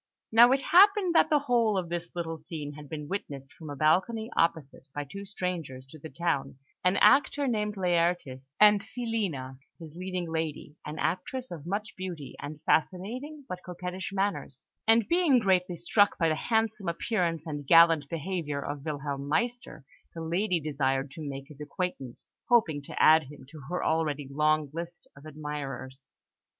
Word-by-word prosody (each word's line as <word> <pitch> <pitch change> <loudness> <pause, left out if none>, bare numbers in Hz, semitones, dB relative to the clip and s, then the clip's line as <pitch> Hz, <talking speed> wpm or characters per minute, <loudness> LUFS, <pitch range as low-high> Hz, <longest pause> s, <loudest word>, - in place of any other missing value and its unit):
Now 235 +2 +7
it 270 0 +2
happened 390 +1 +5
that - - +5
the 300 - +4
whole 240 -7 +2
of 175 -3 -2
this 175 0 -5
little 165 -2 -4
scene 150 -2 -7
had 145 -1 -11
been 150 -2 -6
witnessed 140 -7 -6
from 160 -2 -10
a 145 - -5
balcony 190 - +1
opposite 155 -4 0
by 145 - -2
two 200 +8 -9
strangers 170 -9 -4
to 155 - -12
the 160 - -9
town 140 -7 -2 0.3
an 180 +2 +3
actor 285 0 +4
named 210 -3 -1
Laertes, 170 -7 0
and 210 -1 +7
Filina, 200 - -4 0.2
his 160 -3 -11
leading 185 -1 -4
lady, 160 -2 -4
an 155 - -6
actress 245 +11 -2
of 165 -2 -8
much 205 +3 -3
beauty, 175 -8 -7
and 150 +1 -8
fascinating 245 - -1
but 180 0 -6
coquettish 180 +1 -6
manners; 195 -9 -3 0.2
and 225 -1 +5
being 340 -6 +4
greatly 185 -5 +2
struck 205 +5 +2
by 165 -2 +2
the 155 - +1
handsome 220 +1 -1
appearance 170 -2 -1
and 145 -3 -6
gallant 165 -3 +6
behaviour 165 -3 -3
of 145 0 -5
Wilhelm 140 -2 -4
Meister, 235 - -2 0.3
the 165 - -5
lady 175 +3 0
desired 135 -2 -1
to 160 - -9
make 135 0 -7
his 150 -1 -13
acquaintance, 150 -4 -5 0.2
hoping 175 - +3
to 140 - -8
add 155 -1 +6
him 135 -1 -13
to 155 - -11
her 180 - -2
already 150 -3 0
long 150 0 +1
list 170 +1 -7
of 140 +2 -13
admirers. 140 -3 -7
165 Hz, 165 wpm, -28 LUFS, 145-200 Hz, 0.3 s, Now